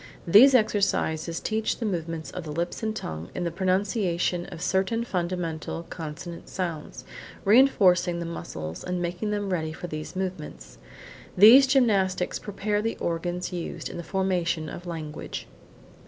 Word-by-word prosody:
These 240 +10 +8
exercises 175 -7 +1
teach 220 0 -1
the 235 - -3
movements 165 -5 -3
of 180 - -6
the 155 - -6
lips 170 +3 -3
and 220 -1 -2
tongue 80 - -6
in - - -2
the 170 - -1
pronunciation 185 -1 0
of 175 - -9
certain 190 +6 0
fundamental 175 -5 -3
consonant 165 +1 -7
sounds, 170 -5 -5 0.4
reinforcing 190 -7 +5
the 170 - -4
muscles, 80 - -6
and 180 0 -2
making 175 +4 -2
them 205 -2 -2
ready 160 -2 -2
for 170 - -7
these 155 +1 -6
movements. 185 -5 -6 0.6
These 240 +8 +9
gymnastics 200 -9 +2
prepare 205 0 -2
the 225 +1 -2
organs 175 +2 -3
used 175 -2 -5
in - - -7
the 170 - -5
formation 175 -3 -1
of 175 +3 -8
language. 155 -3 -6
180 Hz, 145 wpm, -26 LUFS, 165-200 Hz, 0.6 s, These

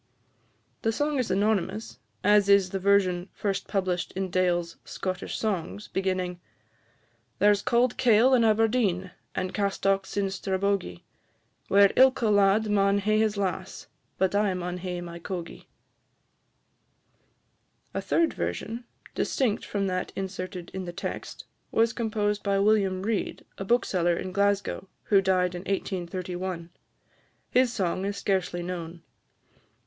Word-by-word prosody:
The 225 - +1
song 290 +4 0
is 250 - -1
anonymous, 185 - 0 0.2
as 205 0 +4
is 200 -2 +5
the 195 - -2
version, 190 -2 +2
first 200 -2 -2
published 185 -4 -1
in 190 -1 -3
Dale's 175 -2 0
"Scottish 185 -1 -4
Songs," 205 -1 -3
beginning 185 -2 -2 1.0
"There 205 0 +5
's 200 - -2
cauld 240 +2 +2
kail 250 0 +5
in 245 -2 +5
Aberdeen, 215 -4 +2 0.2
And 185 - -2
castocks 195 -1 0
in 195 -1 +1
Strabogie, 190 - -1 0.6
Where 200 0 +6
ilka 260 -3 +5
lad 205 +1 +4
maun 200 -1 +3
hae 215 +2 +2
his 215 -1 +1
lass, 190 -1 -3 0.3
But 190 0 +1
I 200 -2 +2
maun 180 0 -4
hae 180 -1 -4
my 170 -1 -8
cogie." 175 -1 -7 2.3
A - - -2
third 335 -1 +1
version, 235 +2 -4 0.3
distinct 240 -6 0
from 200 -1 -2
that 185 -1 -2
inserted 185 -2 -5
in 190 -1 -4
the 175 - -5
text, - - -6 0.3
was 230 +1 +2
composed 210 -3 -1
by 200 -1 +1
William 195 -2 +2
Reid, 220 0 -2
a - - -2
bookseller 185 -6 +1
in 185 - -4
Glasgow, 200 0 0 0.2
who 200 -2 +4
died 185 -1 +2
in 175 - -5
1831. 180 -2 -3 0.8
His 250 -1 +4
song 185 -4 -1
is 200 0 -3
scarcely 185 -3 -1
known. 170 -1 -6
195 Hz, 135 wpm, -27 LUFS, 185-210 Hz, 2.3 s, Where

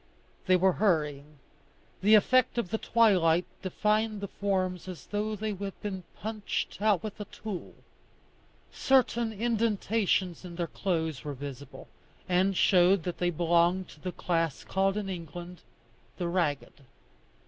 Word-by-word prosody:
They 185 - +6
were 190 +1 +4
hurrying. 150 -7 0 0.6
The 210 +3 +6
effect 255 +4 +3
of 215 -7 -1
the 220 - 0
twilight 180 -7 +3 0.2
defined 215 +3 0
the 200 - -4
forms 185 -3 -2
as 185 -3 -8
though 215 +1 -2
they 215 +1 -3
had 195 0 -6
been 195 -3 -3
punched 210 -1 -4
out 210 -5 +3
with 215 -1 -6
a - - -4
tool. 205 -3 -7 1.0
Certain 240 -3 +2
indentations 215 -5 0
in 175 -2 -8
their 170 0 -1
clothes 160 -4 -2
were 145 -1 -5
visible, 140 0 -9 0.4
and 185 +1 +2
showed 180 -1 +4
that 180 - -4
they 175 - +2
belonged 175 +2 +2
to - - -15
the 180 +3 -4
class 165 -4 -1
called 195 +1 0
in 205 -2 -3
England 175 0 -7 0.6
the 175 - -2
ragged. 170 -5 -1
185 Hz, 140 wpm, -29 LUFS, 170-210 Hz, 1.0 s, They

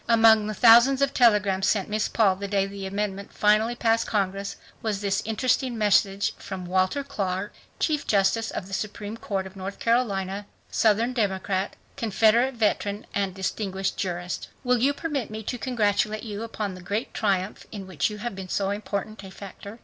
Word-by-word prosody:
Among 225 -2 +6
the 215 - -3
thousands 245 +4 +7
of 275 - +1
telegrams 205 -5 +3
sent 200 -3 +1
Miss 215 0 0
Paul 200 -5 +3
the 200 +1 -4
day 195 -1 +1
the 195 0 -6
amendment 200 0 -3
finally 215 +3 +3
passed 230 -1 +1
Congress 195 -1 -1 0.3
was 215 -3 -1
this 195 -1 0
interesting 245 +2 0
message 200 -1 +2
from 190 -2 -6
Walter 185 +10 +1
Clark, 200 -7 -3 0.2
Chief 300 -3 0
Justice 200 +3 +2
of 185 - -5
the 195 - -10
Supreme 210 +1 -4
Court 200 -4 -3
of 190 +1 -10
North 195 +1 -6
Carolina, 200 -4 0 0.2
Southern 225 +3 +2
Democrat, 195 -3 -1 0.2
Confederate 230 +4 +3
Veteran 210 -2 0
and 195 -2 -1
distinguished 195 0 -2
jurist: 180 -2 -3 0.2
"Will 250 -1 +2
you 270 +4 +3
permit 285 -5 -3
me 220 0 -6
to 245 +3 -4
congratulate 215 -3 0
you 210 -2 -5
upon 215 -3 -4
the 185 - -10
great 205 +6 -3
triumph 195 -2 -1
in 200 -3 -7
which 185 -2 -1
you 210 - -7
have 240 +2 -4
been 190 -1 -8
so 195 +1 0
important 205 0 -4
a 190 - -9
factor? 200 +2 -10
205 Hz, 175 wpm, -25 LUFS, 195-225 Hz, 0.3 s, thousands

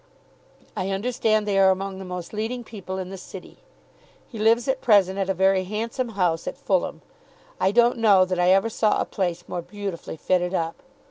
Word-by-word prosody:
I 190 -2 -2
understand 215 +1 0
they 195 -1 +2
are 190 0 +6
among 190 0 -2
the 190 - -7
most 180 0 -7
leading 225 +3 -3
people 195 -4 -7
in 185 0 -5
the 195 - -7
City. - - -11 0.7
He 225 - -9
lives 230 +3 +3
at 265 0 0
present 200 -4 +4
at 195 -1 -1
a - - +2
very 190 +1 +3
handsome 230 +5 -3
house 170 -3 0
at - - -4
Fulham. - - -1 0.6
I - - +3
don't 240 +2 +3
know 200 -4 +5
that 185 -1 -2
I 180 0 +4
ever 195 +4 +4
saw 215 -1 +1
a - - 0
place 175 -2 -3
more 175 - -4
beautifully 195 -3 -6
fitted 180 +2 0
up. 165 -1 -2
195 Hz, 195 wpm, -24 LUFS, 185-220 Hz, 0.7 s, are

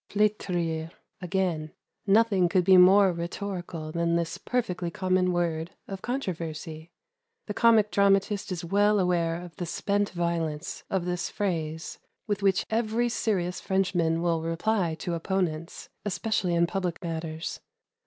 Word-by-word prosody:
"Fletrir," 175 -6 0 0.3
again. 180 -4 -1 0.3
Nothing 200 -3 +4
could 185 0 +3
be 190 +1 +6
more 190 +1 +7
rhetorical 170 -2 -5
than 170 0 +1
this 170 -1 -2
perfectly 185 -8 -2
common 185 +1 +1
word 170 -1 -1
of 195 -1 -6
controversy. 165 - -4 0.6
The - - -4
comic 225 -3 +4
dramatist 200 0 +2
is 175 -2 -3
well 205 +3 +3
aware 170 -2 +1
of 175 -1 -10
the 175 -3 -4
spent 200 +4 0
violence 170 -3 -2
of 190 -3 -1
this 180 -1 -2
phrase, 160 -5 -3 0.3
with 205 -2 -2
which 195 -1 +2
every 230 +1 +1
serious 185 -6 -1
Frenchman 175 -4 +1
will 165 -2 +1
reply 165 +1 0
to 170 +2 -4
opponents, 170 -1 -2
especially 195 -3 0
in 170 0 +4
public 180 0 -3
matters. 160 -1 -4
180 Hz, 135 wpm, -27 LUFS, 165-200 Hz, 0.6 s, more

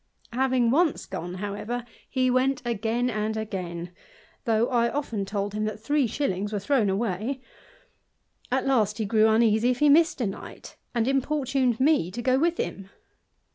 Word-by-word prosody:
Having 255 -2 +2
once 315 +2 +2
gone, 175 +2 -6
however, 210 +5 -4 0.2
he 255 -1 +1
went 255 +1 +1
again 235 +1 0
and 215 -2 -2
again, 180 -5 -5 0.5
though 225 0 +2
I 235 -2 +2
often 230 -9 -3
told 200 0 -3
him 215 0 -1
that 215 0 -4
three 285 +3 +1
shillings 205 -5 -2
were 210 - -1
thrown 220 0 +1
away: 215 +5 -1 1.1
at 260 +1 +1
last 220 -6 +2
he 220 - -1
grew 215 +1 +4
uneasy 220 +1 +3
if 250 - +1
he 295 +3 +4
missed 325 +3 +4
a 240 - 0
night, 195 - -8 0.2
and 235 0 +1
importuned 270 -3 +1
me 275 - +3
to 240 - -4
go 260 +1 +3
with 340 +2 +1
him. 195 -1 -4
235 Hz, 165 wpm, -26 LUFS, 210-265 Hz, 1.1 s, grew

